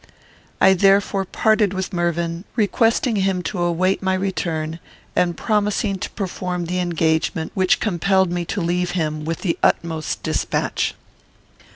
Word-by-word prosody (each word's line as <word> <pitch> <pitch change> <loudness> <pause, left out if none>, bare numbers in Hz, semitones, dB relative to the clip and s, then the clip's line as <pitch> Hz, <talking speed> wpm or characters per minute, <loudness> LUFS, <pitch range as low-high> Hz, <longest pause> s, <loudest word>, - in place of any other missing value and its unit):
I 190 - +6
therefore 195 +1 +3
parted 215 0 +2
with 190 +1 -3
Mervyn, 170 0 -1
requesting 225 +1 +2
him 190 -2 0
to 180 0 -3
await 175 +2 +1
my 190 -1 +1
return, 165 -4 -2 0.4
and 175 -1 +1
promising 210 -2 0
to - - -4
perform 180 -3 -3
the 180 +2 -2
engagement 160 -2 0
which 185 -1 +2
compelled 190 -1 +1
me 175 0 -1
to 190 - -3
leave 175 +1 0
him, 155 -2 -2
with 165 0 -3
the 175 -4 -1
utmost 160 -2 0
despatch. - - -1
180 Hz, 140 wpm, -21 LUFS, 170-195 Hz, 0.4 s, I